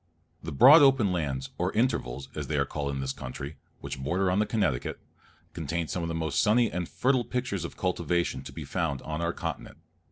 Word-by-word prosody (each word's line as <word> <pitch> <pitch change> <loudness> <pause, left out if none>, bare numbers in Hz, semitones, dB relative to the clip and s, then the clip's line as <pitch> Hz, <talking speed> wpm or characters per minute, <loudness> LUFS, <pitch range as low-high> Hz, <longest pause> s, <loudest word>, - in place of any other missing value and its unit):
The 80 - -6
broad 140 - +8
open 135 -8 +5
lands, 70 -7 -2
or 90 +2 +1
intervals, 70 - 0
as - - -5
they - - -1
are - - +2
called 70 -2 -3
in 70 -1 -3
this 65 0 -2
country, 70 +2 -7 0.2
which - - -6
border 90 +7 +1
upon 90 +2 +2
the 105 - +2
Connecticut, 75 - -1 0.5
contain 80 +1 -3
some 90 - -2
of 85 - -3
the 85 - -2
most 80 -3 0
sunny 115 +2 +3
and 90 -2 -3
fertile 130 -1 +2
pictures 125 -9 -3
of 85 - -7
cultivation 85 -2 0
to - - -7
be - - -7
found 80 -7 -2
on 80 +1 -4
our 85 0 0
continent. - - -6
85 Hz, 210 wpm, -28 LUFS, 70-105 Hz, 0.5 s, broad